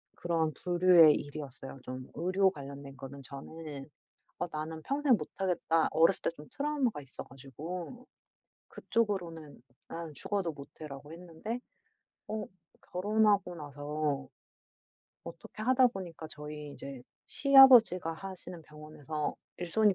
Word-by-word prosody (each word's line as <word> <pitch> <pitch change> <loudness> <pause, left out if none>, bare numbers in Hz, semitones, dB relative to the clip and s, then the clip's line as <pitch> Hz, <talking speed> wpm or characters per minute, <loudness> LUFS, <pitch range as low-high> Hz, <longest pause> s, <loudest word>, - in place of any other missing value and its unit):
그런 165 -2 0
부류의 175 -2 +6
일이었어요. 140 -2 -7
좀 130 0 -7
의료 185 +3 +3
관련된 140 -3 -9
거는 135 +1 -9
저는 140 +2 -8 0.5
'어 175 - -1
나는 160 +1 -5
평생 275 - +3
못하겠다.' 175 -5 0
어렸을 165 +4 +4
때 - - +1
좀 150 +1 -11
트라우마가 280 - 0
있어 135 - -9
가지고 165 - -8 0.6
그쪽으로는 175 - -2 0.3
'나는 165 -2 -6
죽어도 185 +3 -1
못 140 -1 -10
해.'라고 145 0 -8
했는데 180 +7 -6 0.7
어 215 0 -2 0.5
결혼하고 205 -1 +2
나서 145 -2 -3 1.0
어떻게 170 +5 -9
하다 255 +2 +5
보니까 175 -7 -7
저희 150 -1 -8
이제 135 -3 -8 0.2
시아버지가 250 - +7
하시는 180 -1 -8
병원에서 150 0 -5 0.2
일손이 200 +4 +3
165 Hz, 285 characters per minute, -31 LUFS, 145-195 Hz, 1.0 s, 시아버지가